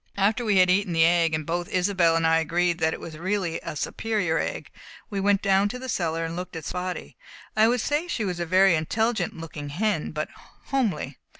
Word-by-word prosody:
After 210 +5 +2
we 210 -4 +2
had 185 -1 +5
eaten 190 -1 +1
the 165 0 +5
egg 165 -1 +3
and 155 -1 -3
both 175 +2 -3
Isobel 180 -3 +2
and 165 0 +1
I 165 0 +4
agreed 170 +2 0
that 160 -1 +2
it - - -5
was 155 -2 -9
really 185 -2 -1
a - - -6
superior 180 0 -1
egg - - -4 0.4
we 200 - -2
went 200 0 +2
down 195 +1 +3
cellar 180 -10 -2
and 165 0 -5
looked 180 0 -6
at 160 -2 -6
Spotty. 180 0 -5 0.4
I 215 +1 +5
should 245 0 +1
say 295 +7 0
she 230 -10 -2
was 180 -2 -3
a 175 - -1
very 190 +2 +5
intelligent 195 +5 0
looking 150 -3 -7
hen, 185 +2 -1
but 155 0 -3 0.4
homely. 205 - -1
180 Hz, 205 wpm, -25 LUFS, 165-205 Hz, 0.4 s, had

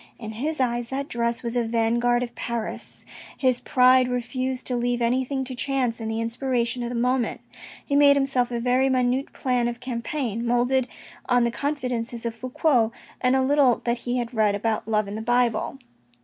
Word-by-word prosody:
In 220 -2 -7
his 290 +8 -3
eyes, 240 -2 0
that 275 +1 -3
dress 235 -1 -2
was 235 0 -2
a 240 - +2
vanguard 235 +2 +1
of 240 -1 -6
Paris. 235 -2 -5 0.3
His 255 -2 +2
pride 255 0 +4
refused 250 +1 -3
to 250 - -1
leave 245 0 0
anything 260 +3 0
to 260 0 -5
chance 250 -2 -1
and 220 -1 -4
the 220 0 -2
inspiration 240 +1 -1
of 240 - -3
the 245 - -4
moment. 250 +1 0 0.5
He 280 - -1
made 285 0 +7
himself 270 -3 +1
a 240 -1 -2
very 250 +2 +2
minute 255 +1 +1
plan 250 -2 0
of 240 0 -4
campaign, 240 -1 -3
moulded 245 +2 +2 0.4
on 245 -1 +4
the 235 - +1
confidences 250 -4 -3
of 230 - -2
Fouque, 250 0 +1 0.3
and 255 0 +3
a 265 - +3
little 270 -2 +3
that 240 0 0
he 245 +1 -2
had 240 0 -3
read 215 -3 +2
about 215 +1 -1
love 215 -2 +1
in 200 - -6
the 215 - -4
Bible. 240 +1 +1
245 Hz, 190 wpm, -24 LUFS, 235-260 Hz, 0.5 s, made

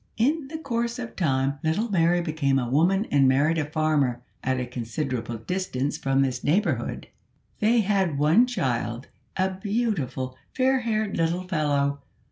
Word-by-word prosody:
In 285 +5 +1
the 315 +3 -5
course 235 -5 -2
of 245 -2 -6
time 140 -4 0
little 205 +9 0
Mary 175 -1 +3
became 155 -5 0
a 125 -2 0
woman 175 - +2
and 140 -2 +5
married 150 +5 +3
a 150 -1 -2
farmer 150 -6 +1 0.2
at 130 0 0
a 125 - -2
considerable 120 -1 -4
distance 145 - -2
from 135 0 +1
this 125 -2 -2
neighbourhood. 155 - 0 0.5
They 225 +2 +4
had 190 -7 +1
one 160 - +4
child, 125 - -2 0.3
a 190 0 +1
beautiful 190 - -2 0.2
fair 265 0 +3
haired 220 -4 -1
little 170 +2 0
fellow. 140 -5 0
155 Hz, 150 wpm, -25 LUFS, 135-205 Hz, 0.5 s, and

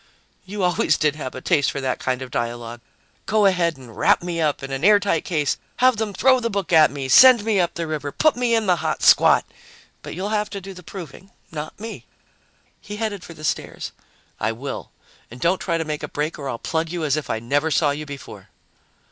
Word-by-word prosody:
"You 200 +1 -4
always 180 -3 +2
did 150 -1 +1
have 130 -4 -6
a 130 - -7
taste 145 0 +2
for 140 - -4
that 130 -2 -2
kind 130 0 -2
of 130 - -10
dialogue. 120 0 -4 0.5
Go 215 0 +3
ahead 175 -5 +2
and 125 -4 -13
wrap - - +3
me 170 -1 -3
up 150 -3 0
in 135 - -6
an 135 +2 -4
airtight 205 -4 +4
case, 150 -6 0 0.2
have 255 -2 +3
them 220 -1 -2
throw 260 +7 +4
the 230 -1 -2
book 200 -5 -3
at 155 -2 +7
me, 140 -2 -5
send 245 - +8
me 215 -3 +2
up 175 -1 0
the 170 - -3
river, 150 -2 -4
put 310 - +2
me 240 -1 +1
in 225 -1 +1
the 180 -2 +3
hot - - -2
squat. - - +6 0.6
But - - -8
you'll 195 +3 -3
have 210 -1 -1
to 200 - -5
do 195 0 -9
the 180 - -12
proving, 180 +1 -10 0.2
not 155 +1 -7
me." 225 +1 -8 0.8
He 205 - -8
headed 210 -3 -3
for 170 - -11
the 155 - -12
stairs. 155 - -3 0.5
"I 115 - 0
will. 135 +5 -6 0.4
And 120 - -11
don't 180 +7 +1
try 170 -3 0
to 165 - -2
make 150 -1 -4
a 150 - -4
break 150 +2 -3
or 140 -2 -4
I'll 120 - -3
plug 160 +5 -2
you 175 -2 -3
as 145 -2 +1
if 155 -3 -4
I - - 0
never 140 +7 0
saw 150 0 +2
you 150 +1 -5
before." 140 -1 -10
165 Hz, 230 wpm, -22 LUFS, 140-200 Hz, 0.8 s, send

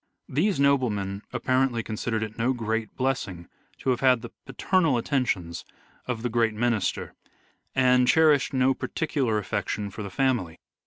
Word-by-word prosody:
These 180 +6 +1
noblemen 110 -9 +1
apparently 130 -1 +1
considered 110 0 -2
it 110 -1 -6
no 125 +3 +1
great 115 -2 -3
blessing 125 -10 -2 0.3
to 130 - 0
have 125 - 0
had 130 -3 +3
the - - -8 0.2
paternal 165 -9 +1
attentions 95 - -1 0.4
of 120 -2 -3
the 125 - 0
great 115 -1 +1
minister, 115 -3 -1 0.6
and 125 -1 +4
cherished 155 -3 +4
no 130 0 +3
particular 135 -7 -1
affection 105 0 -3
for 105 - -7
the 100 - -5
family. 110 -7 0
120 Hz, 145 wpm, -26 LUFS, 110-130 Hz, 0.6 s, and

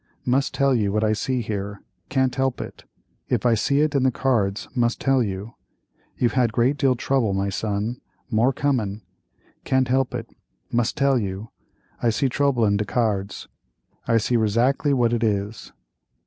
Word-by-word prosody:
Must 135 +2 +1
tell 140 -1 +3
you 105 -5 +1
what 105 +1 0
I 110 0 +3
see 125 +3 -1
here—can't 105 +5 -3
help 135 -1 0
it—if - - -6
I 120 - +5
see 140 +6 +2
it 155 0 +1
in 140 - +2
the 130 - +4
cards, 115 -6 0
must 120 -1 +1
tell 135 -1 +2
you. 100 +1 -4 0.6
You've 120 -2 +1
had 125 -3 +2
great 125 +5 +2
deal 135 -2 +3
trouble, 120 -5 0
my 100 +1 0
son; 105 +4 -2 0.3
more 115 +4 +3
comin'. 115 -7 -1 0.6
Can't 130 -1 +1
help 130 0 +1
it; - - -4 0.4
mus' 120 0 +1
tell 140 -3 +2
you. 100 +1 -4 0.5
I 120 - +3
see 130 +4 +1
trouble 130 -3 +2
in 100 -1 +2
de 105 - -1
cards; 105 -3 -1 0.6
I 115 - +4
see 120 +2 +1
razackly 120 +7 +2
what 120 -2 +2
it 120 -1 0
is." 105 0 -2
120 Hz, 165 wpm, -23 LUFS, 105-130 Hz, 0.6 s, I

